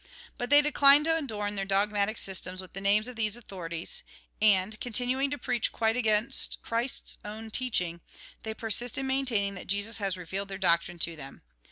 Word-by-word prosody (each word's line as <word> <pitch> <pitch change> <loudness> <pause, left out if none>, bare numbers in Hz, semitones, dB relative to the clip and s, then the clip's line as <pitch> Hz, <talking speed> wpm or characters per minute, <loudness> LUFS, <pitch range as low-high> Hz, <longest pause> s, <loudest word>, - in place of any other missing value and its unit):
But 245 -2 -5
they 290 +1 +7
decline 285 0 +6
to 325 +1 +2
adorn 215 -10 -2
their 195 - 0
dogmatic 200 +2 +1
systems 185 -1 -3
with 185 -2 -8
the 195 - -5
names 205 +3 +3
of 250 - -7
these 215 -1 0
authorities, 185 - -6 0.4
and, 210 0 +3
continuing 250 +3 +1
to 290 - -3
preach 245 -5 -1
quite 225 0 0
against 220 -3 +2
Christ's 235 +3 -2
own 220 +1 -7
teaching, 180 -9 0 0.4
they 220 0 -5
persist 225 +2 -1
in 270 - -2
maintaining 255 -7 0
that 180 - -9
Jesus 205 +4 0
has 195 -2 -1
revealed 190 +3 -4
their 195 -1 -6
doctrine 175 -1 +2
to 170 0 -1
them. 135 -3 -11
215 Hz, 180 wpm, -28 LUFS, 195-245 Hz, 0.4 s, they